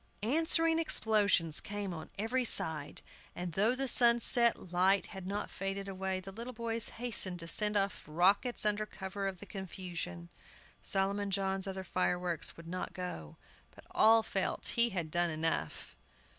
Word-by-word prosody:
Answering 325 +5 +2
explosions 205 - +2
came 205 -2 -5
on 160 - -9
every 235 +5 -1
side, 160 -10 +1 0.3
and, 175 -1 -5
though 215 +8 +1
the 270 +1 -2
sunset 235 -4 +5
light 190 +2 +2
had 190 -3 -9
not 205 +2 -4
faded 195 0 -5
away, 190 -1 -4
the 190 +1 -10
little 235 +5 -8
boys 230 0 -2
hastened 210 -7 +2
to 165 - -7
send 210 +4 +3
off 200 0 -2
rockets 195 +10 +2
under 210 0 0
cover 195 0 -6
of 190 -1 -5
the - - -10
confusion. 175 - -7 0.5
Solomon 200 +1 -1
John's 195 0 -1
other 190 0 -5
fireworks 180 -2 -1
would 165 0 -12
not 185 +2 -5
go. 130 - -7 0.4
But - - -16
all 225 0 +4
felt 195 -3 -1
he 235 0 +3
had 175 -6 -4
done 175 +1 +2
enough. 155 - -3
195 Hz, 155 wpm, -32 LUFS, 180-220 Hz, 0.5 s, sunset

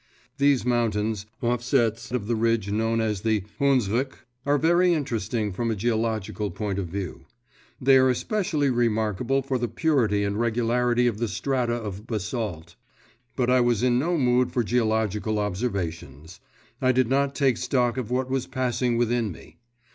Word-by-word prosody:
These 140 -3 +3
mountains, 110 -4 0 0.2
offsets 120 -1 0
of 125 -5 -2
the 115 +2 0
ridge 115 -3 0
known 115 +2 0
as 110 -4 -1
the 110 -3 +1 0.2
Hundsrück, 130 -2 +1 0.2
are 145 +1 +4
very 175 +3 +3
interesting 115 - -2
from 115 +5 -2
a 110 - 0
geological 110 -2 -1
point 100 -2 -3
of 95 - -3
view. 95 0 -6 0.5
They 135 +1 +5
are 130 0 +4
especially 155 - 0
remarkable 120 +2 0
for 130 -1 -1
the 120 - -1
purity 115 -5 +1
and 100 +1 -1
regularity 120 +1 +1
of 115 -3 0
the 115 - 0
strata 125 0 -1
of 105 -2 -6
basalt; 105 -6 -4 0.6
but 125 -1 +1
I 130 0 +5
was 120 -2 +1
in 125 -1 +3
no 170 +5 0
mood 125 -2 +2
for 120 - 0
geological 110 -2 0
observations. 90 - -4 0.4
I 130 - +4
did 130 -1 +2
not 140 +2 +1
take 135 -5 +2
stock 125 -3 +1
of 125 -5 -3
what 125 +1 0
was 130 -1 -2
passing 125 -2 0
within 120 -2 +1
me. - - -14
120 Hz, 160 wpm, -25 LUFS, 105-130 Hz, 0.6 s, They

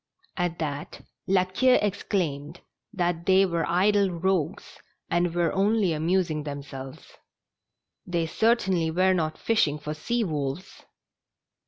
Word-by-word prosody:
At 175 -2 -1
that 145 -3 -5 0.3
La 185 -1 +3
Queue 250 +8 +3
exclaimed 175 -7 -2 0.3
that 175 -4 -2
they 190 +1 +5
were 170 -3 -1
idle 200 +3 +3
rogues, 180 -1 -2 0.3
and 175 0 +1
were 170 -2 +1
only 200 -2 +2
amusing 165 0 0
them 145 -1 -6
selves. 135 -1 -10 0.9
They 170 -2 0
certainly 190 -3 +1
were 185 +3 +3
not 160 -3 -1
fishing 160 -10 +1
for 150 0 -5
sea 235 +10 -1
wolves 150 0 -4
175 Hz, 125 wpm, -26 LUFS, 155-190 Hz, 0.9 s, they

